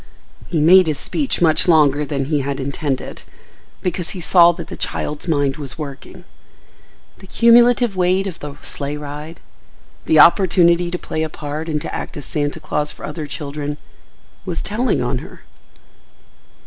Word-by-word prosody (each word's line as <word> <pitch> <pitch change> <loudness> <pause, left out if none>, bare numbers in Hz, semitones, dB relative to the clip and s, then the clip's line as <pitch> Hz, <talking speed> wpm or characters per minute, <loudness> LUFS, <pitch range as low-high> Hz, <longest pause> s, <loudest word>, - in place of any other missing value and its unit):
He 170 - -2
had 150 - +2
made 185 +1 +7
his 155 -2 -1
speech 275 - -2
much 160 +1 +3
longer 150 -3 +4
than 140 -2 -3
he 150 +1 0
had 140 0 -3
intended, 140 0 -4 0.6
because 180 -1 -2
he - - -5
saw 175 0 +6
that 170 -1 -8
the - - -9
child's 150 +3 -4
mind 145 -3 0
was 145 -1 -7
working; 140 -3 -9 1.0
the 190 - -14
cumulative 235 0 +4
weight 185 +1 +1
of 185 -4 -6
the 145 -1 -8
sleigh 145 +1 -3
ride, 150 +2 -8 0.7
the 160 - +3
opportunity 175 -1 +5
to 180 - -3
play 155 - -4
a 160 - -2
part 155 +2 -6
and 150 -1 -1
to - - -6
act - - -6
as 145 - -6
Santa 145 -1 -2
Claus 150 0 -2
for - - -10
other 150 0 -6
children, 145 +1 -5 0.7
was 175 -3 -4
telling 230 +5 0
on - - -1
her. - - -12
155 Hz, 165 wpm, -19 LUFS, 145-180 Hz, 1.0 s, made